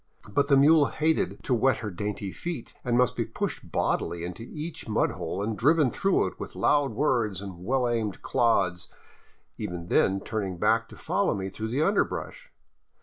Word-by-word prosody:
But 140 +6 +2
the 140 -2 +5
mule 145 +1 +6
hated 160 +1 0
to 130 - 0
wet 125 +1 +3
her 105 -3 -5
dainty 100 +1 -4
feet, 170 - -6
and 120 -1 +1
must 125 0 +3
be 120 - 0
pushed 115 0 -5
bodily 85 -1 -1
into 90 +5 -6
each 155 -4 -6
mud 105 - +2
hole 100 - -4
and 110 +1 -2
driven 145 +2 +3
through 195 -1 +2
it - - -6
with - - -7
loud 145 -4 +2
words 115 -7 +1
and 95 -3 -8
well 125 +4 +1
aimed 115 -4 -2
clods, 95 -8 +1 0.7
even 85 -1 -5
then 95 - +4
often 95 - -5
turning 100 -5 -3
back - - +2
to - - -12
follow - - 0
me 95 -1 -3
through 110 +3 -4
the 130 +7 0
underbrush. - - -1
115 Hz, 185 wpm, -27 LUFS, 100-145 Hz, 0.7 s, mule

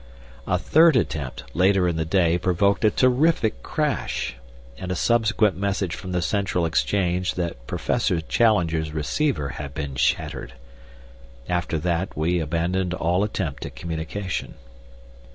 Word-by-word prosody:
A - - +2
third 160 -1 +5
attempt, 70 - -1
later 95 +1 +3
in 85 - 0
the 80 0 -1
day, 85 0 +2
provoked 95 +2 +1
a 110 - +6
terrific 130 0 +2
crash, 150 -3 -2 0.5
and 90 - -4
a - - 0
subsequent 110 -1 +2
message 100 -2 -1
from 95 - -6
the 90 -1 0
Central 95 -1 0
Exchange 90 +2 0
that 85 -9 -4
Professor 85 - 0
Challenger's 80 -5 +1
receiver 80 - -1
had 70 -1 -7
been 70 -3 -4
shattered. 65 - -1 0.9
After 85 -2 -1
that 85 +3 -2
we 85 +3 +1
abandoned 85 +3 -1
all 90 +3 +1
attempt 85 - -3
at - - -12
communication. 85 +3 -4
90 Hz, 135 wpm, -24 LUFS, 80-100 Hz, 0.9 s, a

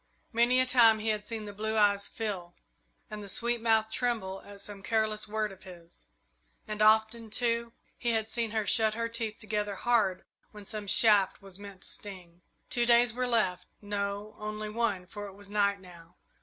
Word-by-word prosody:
Many 240 +2 +4
a 255 - +4
time 235 -4 +6
he 220 +1 -2
had 210 -1 -2
seen 225 -2 -4
the 205 - -8
blue 220 +2 -2
eyes 200 -1 +3
fill 190 -6 -5 0.6
and 210 0 -6
the 200 - -8
sweet 235 +4 0
mouth 220 -1 +2
tremble 220 -6 -2
at 200 0 -12
some 200 0 -6
careless 215 0 0
word 215 0 -2
of 190 - -14
his, 175 -3 -13 0.6
and 215 0 -4
often, 220 +1 +3
too, 235 +1 0 0.3
he 240 - -1
had 220 -1 0
seen 230 0 0
her 215 -1 -1
shut 220 0 +2
her 230 0 -1
teeth 230 -2 -3
together 210 -2 -3
hard 205 -5 +1 0.3
when 210 -1 -11
some 210 0 -5
shaft 205 -2 +5
was 195 -1 -10
meant 200 -2 -11
to - - -3
sting. 180 -4 -7 0.3
Two 240 -1 +1
days 235 -1 +5
were 250 +1 -1
left 215 -7 +1
no, 205 0 -4
only 215 0 -4
one 210 -4 -1
for 205 +3 -8
it 195 - -11
was 200 0 -11
night 200 -1 +2
now. 175 -2 -15
215 Hz, 190 wpm, -30 LUFS, 200-225 Hz, 0.6 s, time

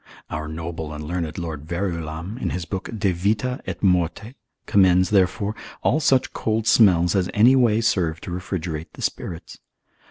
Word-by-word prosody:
Our 75 0 -4
noble 80 0 -5
and 75 0 -6
learned 80 -1 -3
Lord 80 -4 -5
Verulam, 85 +2 -4
in - - -1
his 90 -2 -3
book 95 +1 -5
de 100 -2 +1
vita 105 +8 -1
et 95 0 -5
morte, 90 +4 +1 0.3
commends, 95 -1 +4
therefore, 100 +1 +2 0.3
all 145 - +3
such 135 -4 +2
cold 110 0 -1
smells 90 -7 +5
as 95 -2 +1
any 120 +6 +6
way 115 -4 +3
serve 85 -7 +1
to - - -7
refrigerate 85 -3 -4
the - - -9
spirits. 85 0 -5
90 Hz, 160 wpm, -23 LUFS, 85-105 Hz, 0.3 s, any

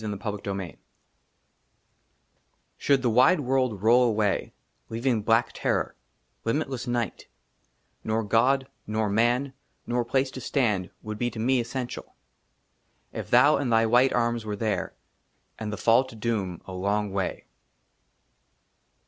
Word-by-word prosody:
10 105 -2 -4
•ft 100 -1 -4
I - - -3
I 85 - -10 2.0
SHOULD 140 -2 +3
THE 120 - +3
WIDE 130 +10 +5
WORLD 130 -6 0
ROLL 120 +3 +6
AWAY, 105 -3 0 0.4
LEAVING 115 0 0
BLACK 115 +3 +2
TERROR, - - -1 0.5
LIMITLESS 130 0 -2
NIGHT, 120 -4 -2 0.8
NOA 110 +1 0
GOD, 125 +6 +2 0.2
NOR 110 0 0
MAN, 120 +5 +1 0.3
NOR 120 0 0
PLACE 130 +2 0
TO 130 - -8
STAND 105 -9 0
WOULD 105 -1 -6
BE 120 - 0
TO 110 - -8
ME 130 +3 +2
ESSENTIAL, 120 +1 -5 1.0
IF - - -6
THOU 150 +2 +6
AND 135 -4 -1
THY 115 0 +4
WHITE 125 +4 +4
ARMS 120 -1 0
WERE 105 -1 -4
THERE, 105 -2 -2 0.6
AND 105 -1 -4
THE 105 - -4
FALL 115 +3 +4
TO 130 -3 -12
DOOM 105 -6 -3
A 95 - -8
LONG 100 +2 -1
WAY. 95 -1 -3
115 Hz, 140 wpm, -26 LUFS, 105-125 Hz, 2.0 s, ROLL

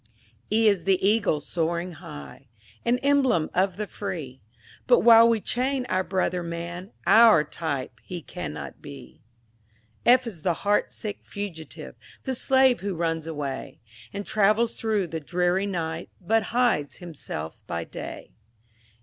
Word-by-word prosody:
E 220 +1 +4
is 200 -5 +2
the 195 -1 +4
Eagle, 205 -7 +2
soaring 170 +3 -2
high; 75 - -11 0.4
An 240 +1 +2
emblem 270 - +3
of 185 0 +1
the 210 - -2
free; 165 - -6 0.5
But - - +6
while 230 0 +8
we 230 -1 +2
chain 255 +4 -1
our 185 0 +1
brother 185 -1 -1
man, 170 +3 -6
Our 220 -8 +7
type 145 -5 -4
he 175 -3 -7
cannot 180 -1 -7
be. 140 -2 -11 0.8
F 250 +1 +5
is 200 -9 -7
the 175 +1 +1
heart 205 +4 +1
sick 210 -2 -6
Fugitive, 185 -6 -7 0.3
The 265 - -2
slave 260 0 +4
who 200 -1 -3
runs 165 -1 -1
away, 145 -4 -5 0.3
And 200 0 -5
travels 215 +3 +2
through 215 -4 0
the 165 -1 -5
dreary 180 +5 0
night, 165 -3 -3
But 220 +4 +1
hides 235 - +1
himself 145 - -7
by 85 0 -3
day. - - -8
185 Hz, 140 wpm, -26 LUFS, 165-225 Hz, 0.8 s, while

